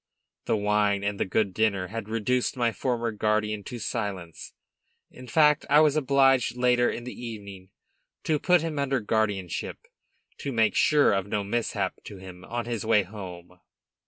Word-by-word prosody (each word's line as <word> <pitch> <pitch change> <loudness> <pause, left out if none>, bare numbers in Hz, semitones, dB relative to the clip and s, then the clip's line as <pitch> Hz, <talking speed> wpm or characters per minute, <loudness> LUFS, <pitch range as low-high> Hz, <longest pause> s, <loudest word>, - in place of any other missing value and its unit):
The - - +1
wine 105 -1 +1
and 100 0 -2
the - - +1
good 100 0 0
dinner 100 -4 0
had 110 0 -6
reduced 125 +4 0
my 120 -2 +2
former 120 -1 -2
guardian 105 -1 -1
to 125 - -6
silence; 100 -7 -5 0.6
in 125 0 -12
fact 150 +3 +4
I 150 - +6
was 150 -2 +4
obliged 135 -4 +3
later 125 -1 +3
in 120 - -5
the 125 - -7
evening 100 -5 -9 0.5
to 155 -2 +1
put 180 0 +3
him 155 -3 -3
under 135 -2 0
guardianship, 105 -5 -2 0.6
to 140 - -4
make 110 -3 +2
sure 150 -6 +4
of 95 0 -1
no 100 0 -1
mishap 100 -2 -2
to 100 - -9
him 90 -1 -11
on 120 0 -4
his 120 -3 -3
way 110 -2 +3
home. 90 -3 -10
110 Hz, 165 wpm, -26 LUFS, 100-125 Hz, 0.6 s, I